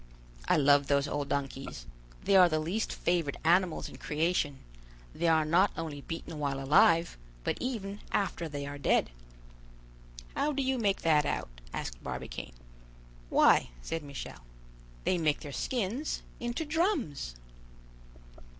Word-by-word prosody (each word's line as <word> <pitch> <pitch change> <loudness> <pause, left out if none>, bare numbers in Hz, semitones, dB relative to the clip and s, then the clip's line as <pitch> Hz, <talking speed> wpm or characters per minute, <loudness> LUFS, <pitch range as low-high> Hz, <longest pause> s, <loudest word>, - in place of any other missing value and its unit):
I - - +4
love 145 -1 +5
those 140 0 +2
old 145 -1 -2
donkeys; 135 - -3 0.4
they 200 - +3
are 180 -2 +8
the 155 - +1
least 175 +8 -1
favored 170 -5 0
animals 175 +1 +3
in - - -11
creation; 155 -2 0 0.6
they 170 - 0
are 160 -1 +4
not 175 +6 +4
only 155 -3 -4
beaten 165 0 -6
while 140 -2 -1
alive, 160 - +4 0.2
but - - 0
even 210 -5 -3
after 175 -4 -1
they 145 -1 -4
are 145 0 -6
dead." 135 - +2 1.2
"How 300 +1 +1
do 275 0 0
you 260 -1 0
make 200 -3 +1
that 150 -2 +4
out?" - - -2 0.2
asked - - -5
Barbicane. - - -6 0.8
"Why," - - +5
said 165 - -3
Michel, 140 - -7 0.6
"they 180 - +1
make 155 -3 +1
their 145 - -7
skins 245 - -2 0.2
into 240 +6 -2
drums." 295 - 0
165 Hz, 140 wpm, -31 LUFS, 145-195 Hz, 1.2 s, are